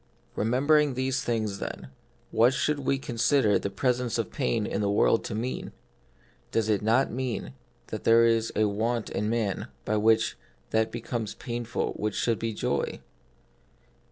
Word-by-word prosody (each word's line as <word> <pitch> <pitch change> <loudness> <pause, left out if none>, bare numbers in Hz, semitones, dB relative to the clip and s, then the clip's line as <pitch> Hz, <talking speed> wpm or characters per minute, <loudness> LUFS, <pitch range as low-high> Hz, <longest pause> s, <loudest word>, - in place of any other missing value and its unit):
Remembering 140 +5 +3
these 130 0 0
things, 110 -4 -1
then, 65 - -6 0.4
what 120 +3 +4
should 150 -1 0
we 135 0 +1
consider 120 -2 +2
the - - -3
presence 125 +3 0
of - - -2
pain 60 - 0
in 100 - -2
the 100 - +1
world 105 +2 +3
to 110 - -4
mean? 120 +4 -4 0.8
Does 110 - 0
it 105 -3 +2
not 115 +5 +2
mean 120 - -3 0.4
that - - -5
there 115 +1 +6
is 115 -1 +2
a 110 - +3
want 110 +3 -1
in 105 +1 -1
man 110 -4 -1 0.2
by 110 - +1
which 110 +1 +3 0.3
that 110 0 +2
becomes 115 -2 -4
painful 120 -1 -3
which 105 -1 -2
should 115 -3 0
be 115 0 -2
joy 105 - -2
115 Hz, 155 wpm, -27 LUFS, 105-125 Hz, 0.8 s, there